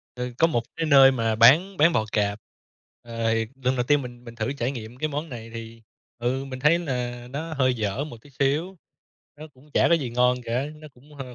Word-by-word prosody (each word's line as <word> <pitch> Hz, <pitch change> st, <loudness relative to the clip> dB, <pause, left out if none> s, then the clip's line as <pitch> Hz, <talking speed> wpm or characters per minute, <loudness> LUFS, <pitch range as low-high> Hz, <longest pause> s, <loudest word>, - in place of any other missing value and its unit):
Ừ, 125 Hz, 0 st, -4 dB
có 165 Hz, -, +5 dB
một 120 Hz, -8 st, 0 dB
cái 165 Hz, -, -1 dB
nơi 135 Hz, -3 st, +7 dB
mà 115 Hz, -3 st, 0 dB
bán 155 Hz, -, +5 dB
bán 165 Hz, +2 st, +5 dB
bò 110 Hz, -, +1 dB
cạp. 105 Hz, -1 st, 0 dB, 0.6 s
Ờ, 115 Hz, -1 st, -1 dB, 0.3 s
lần 130 Hz, +1 st, +1 dB
đầu 125 Hz, -, +1 dB
tiên 145 Hz, +2 st, +2 dB
mình 120 Hz, -1 st, -10 dB
mình 115 Hz, -1 st, -10 dB
thử 115 Hz, +3 st, -2 dB
trải 130 Hz, -3 st, -2 dB
nghiệm 115 Hz, -2 st, -8 dB
cái 155 Hz, -, -1 dB
món 150 Hz, +2 st, -4 dB
này 115 Hz, -4 st, -8 dB
thì, 115 Hz, 0 st, -9 dB, 0.4 s
ừ, 125 Hz, +3 st, -1 dB
mình 130 Hz, -1 st, -7 dB
thấy 150 Hz, +5 st, +4 dB
là 125 Hz, -6 st, -4 dB
nó 160 Hz, +5 st, -5 dB
hơi 130 Hz, -3 st, +2 dB
dở 110 Hz, +4 st, -2 dB
một 150 Hz, -6 st, -9 dB
tí 145 Hz, -, -17 dB
xíu. 145 Hz, +8 st, -1 dB, 0.6 s
Nó 155 Hz, -, -9 dB
cũng 135 Hz, +4 st, -21 dB
chả -, -, +4 dB
có 170 Hz, -, +5 dB
gì 135 Hz, -7 st, -2 dB
ngon 125 Hz, +1 st, +3 dB
cả, 125 Hz, +4 st, -1 dB
nó 155 Hz, 0 st, -12 dB
cũng 145 Hz, +4 st, -19 dB
hơ 130 Hz, -3 st, -8 dB
130 Hz, 230 wpm, -25 LUFS, 120-145 Hz, 0.6 s, nơi